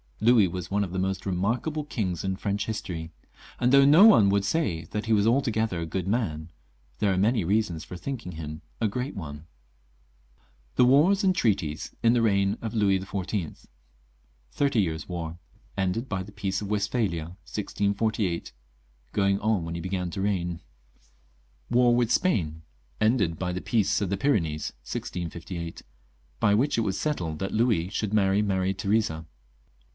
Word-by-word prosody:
Louis 110 -2 +5
was 90 0 -5
one 100 +1 +1
of 95 - -5
the 95 - -1
most 95 0 -2
remarkable 115 - -1
kings 95 - -3
in 95 0 -1
French 100 +1 -2
history; 85 -7 -4 0.5
and 125 +1 +2
though 140 0 +7
no 155 +9 +8
one 110 - +7
would 100 0 +2
say 95 - 0
that 105 +6 -4
he 115 - +3
was 105 -1 +3
altogether 115 -6 +1
a 85 - -2
good 90 +3 -3
man, 85 -8 -1 0.5
there 100 -2 +2
are 95 - 0
many 110 +2 +2
reasons 95 -3 0
for 90 - -8
thinking 105 -1 -5
him 75 -1 -7 0.2
a 115 - +2
great 125 +7 -3
one. 75 -5 -7 1.3
The 125 - +5
Wars 160 - +4
and 185 -1 +3
Treaties 95 - -1
in 115 0 +5
the 120 - +3
Reign 100 -1 +2
op 110 - -3
Louis 100 -4 +3
XIV. 95 -2 -4 0.9
Thirty 140 - +2
Years' 80 -4 -3
War. 85 -1 -5 0.4
Ended 100 +6 -1
by 95 -2 -2
the 95 +2 -9
Peace 100 -1 -2
of 100 - -5
Westphalia, 100 -6 -1
1648. 100 -2 -1 0.6
(Going 100 -1 +2
on 105 -5 0
when 85 - -4
he 85 - -4
began 90 0 -2
to 95 - -4
leign.) 90 -4 -1 1.1
War 120 0 +4
with 120 -1 +1
Spain. 80 - +1 0.4
Ended 110 -7 +2
by 90 +1 -2
the 90 - -3
Peace 110 -3 +1
of 100 - -1
the 100 - -1
Pyrenees, 80 - 0
1658. 85 +4 -5 0.6
(By 105 0 +4
which 130 +6 +1
it - - +3
was 95 -3 -1
settled 85 - -2
that 95 - -3
Louis 110 -7 +2
should 105 +1 -2
marry 100 -1 +3
Maria 95 -2 0
Theresa.) 100 -6 0
100 Hz, 165 wpm, -27 LUFS, 90-110 Hz, 1.3 s, no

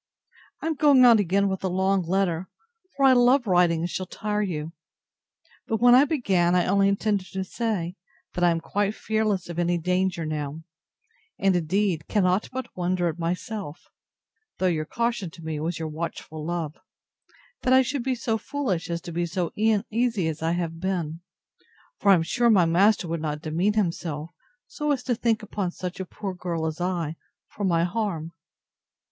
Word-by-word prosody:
I - - -3
am 325 - +1
going 280 -4 +6
on 235 -3 +7
again 200 +1 +2
with 190 -1 -3
a - - +1
long 190 +1 +1
letter; 180 0 0 0.5
for 275 - +2
I 265 - +7
love 250 +1 +4
writing, 175 -4 +3
and 170 - 0
shall 185 +1 -4
tire 210 +2 -2
you. 165 -5 -3 0.9
But, 225 - 0
when 245 0 +6
I 260 +3 +7
began, 190 - +2
I 180 - +3
only 195 +1 +3
intended 200 -1 0
to 190 0 -2
say, 190 -4 -3 0.4
that 175 - -2
I 175 - +6
am 165 -1 0
quite 205 +4 -1
fearless 215 -4 -1
of 170 0 -5
any 175 0 +1
danger 180 0 0
now: 155 0 -4 0.7
and, 195 -1 +2
indeed, 175 -1 0
cannot 190 -1 +1
but 260 -1 -6
wonder 180 -1 0
at 165 +1 -6
myself, 175 0 -4 0.7
(though 185 - -1
your 160 -4 +1
caution 235 -1 -2
to 165 +1 -14
me 155 -2 -3
was 160 +2 -2
your 160 -1 -3
watchful 155 -1 -6
love,) 165 -2 -3 0.9
that 255 - +1
I 260 0 +6
should 260 +1 -2
be 260 0 0
so 225 -2 -1
foolish 200 - -2
as 170 0 -2
to 175 - -8
be 170 +1 -1
so 175 0 -2
uneasy 220 -2 +1
as 160 -1 -4
I 165 +1 +1
have 165 -2 -3
been: 170 -4 -2 0.8
for 205 - +2
I 195 - +9
am 165 - +1
sure 240 +8 +2
my 195 -6 +5
master 185 +3 +3
would 165 -1 -3
not 150 0 -3
demean 170 +7 +1
himself, 170 -6 -2 0.3
so 300 -1 -4
as 265 -3 -1
to 250 - 0
think 230 -1 0
upon 200 -3 -2
such 180 +1 -6
a 190 - -3
poor 195 +1 -6
girl 175 -3 -3
as 160 +2 -3
I, 170 -3 -2 0.3
for 205 - -7
my 170 -3 +2
harm. 175 -4 -2
185 Hz, 185 wpm, -25 LUFS, 170-215 Hz, 0.9 s, I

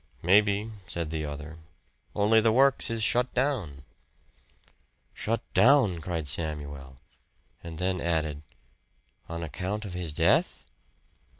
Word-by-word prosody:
"Maybe," 100 +4 +3 0.2
said 85 -2 -4
the 80 -1 -3
other 75 +2 -7 0.6
"only 110 +2 +4
the 110 0 +3
works 135 +3 +3
is 115 -1 -1
shut 125 +3 +2
down." 115 - -1 1.3
"Shut 115 +1 -2
down!" 110 -3 +5
cried 80 -2 -3
Samuel; 70 -3 -4 0.7
and 80 -1 -8
then 90 +1 -1
added, 80 -3 -1 0.9
"On 85 0 -4
account 95 +7 -4
of 95 - -7
his 90 -3 -3
death?" 75 - +1
90 Hz, 115 wpm, -28 LUFS, 80-110 Hz, 1.3 s, down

